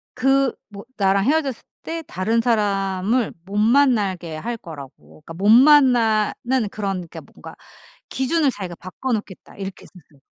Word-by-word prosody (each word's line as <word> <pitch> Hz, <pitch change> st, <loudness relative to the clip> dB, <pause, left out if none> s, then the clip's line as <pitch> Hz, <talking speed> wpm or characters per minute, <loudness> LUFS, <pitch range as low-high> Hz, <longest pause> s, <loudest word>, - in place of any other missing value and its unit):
그 270 Hz, 0 st, +2 dB, 0.2 s
뭐 200 Hz, -1 st, -10 dB
나랑 195 Hz, -1 st, +2 dB
헤어졌을 280 Hz, -3 st, 0 dB, 0.2 s
때 330 Hz, 0 st, -5 dB
다른 220 Hz, +5 st, 0 dB
사람을 205 Hz, 0 st, 0 dB
못 200 Hz, +2 st, -6 dB
만나게 210 Hz, -, +2 dB
할 230 Hz, +9 st, -4 dB
거라고. 155 Hz, -5 st, -12 dB
그러니까 165 Hz, -, -9 dB
못 195 Hz, +5 st, 0 dB
만나는 245 Hz, -3 st, +4 dB
그런 195 Hz, -4 st, -4 dB
그러니까 -, -, -10 dB
뭔가 -, -, -13 dB, 0.5 s
기준을 280 Hz, +3 st, +1 dB
자기가 190 Hz, -7 st, -7 dB
바꿔 185 Hz, +10 st, -5 dB
놓겠다 210 Hz, -4 st, -6 dB
이렇게 195 Hz, -1 st, -7 dB
했었어요. 150 Hz, -6 st, -19 dB
215 Hz, 325 characters per minute, -21 LUFS, 190-255 Hz, 0.5 s, 만나는